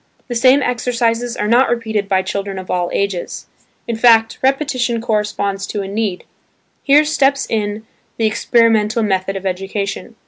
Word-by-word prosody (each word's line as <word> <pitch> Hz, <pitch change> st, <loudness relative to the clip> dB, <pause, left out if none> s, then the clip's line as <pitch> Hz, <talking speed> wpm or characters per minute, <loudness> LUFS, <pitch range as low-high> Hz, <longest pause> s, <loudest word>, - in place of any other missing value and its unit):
The -, -, -2 dB
same 255 Hz, +4 st, +4 dB
exercises 240 Hz, -1 st, -1 dB
are 210 Hz, -, -1 dB
not 240 Hz, +4 st, +4 dB
repeated 220 Hz, -4 st, -2 dB
by 190 Hz, -1 st, +2 dB
children 195 Hz, 0 st, -4 dB
of 185 Hz, -1 st, -6 dB
all 175 Hz, -1 st, 0 dB
ages. 200 Hz, -3 st, -3 dB, 0.4 s
In 235 Hz, -, -2 dB
fact, 225 Hz, -1 st, +4 dB
repetition 260 Hz, -3 st, 0 dB
corresponds 210 Hz, -3 st, -2 dB
to 205 Hz, -2 st, -3 dB
a -, -, -6 dB
need. 200 Hz, -2 st, -3 dB, 0.6 s
Here 290 Hz, +2 st, +4 dB
steps 280 Hz, -2 st, +1 dB
in 210 Hz, 0 st, -3 dB, 0.3 s
the 225 Hz, -, 0 dB
experimental 225 Hz, 0 st, +2 dB
method 195 Hz, -1 st, -1 dB
of 195 Hz, 0 st, -6 dB
education. 195 Hz, +4 st, -4 dB
220 Hz, 150 wpm, -17 LUFS, 200-240 Hz, 0.6 s, same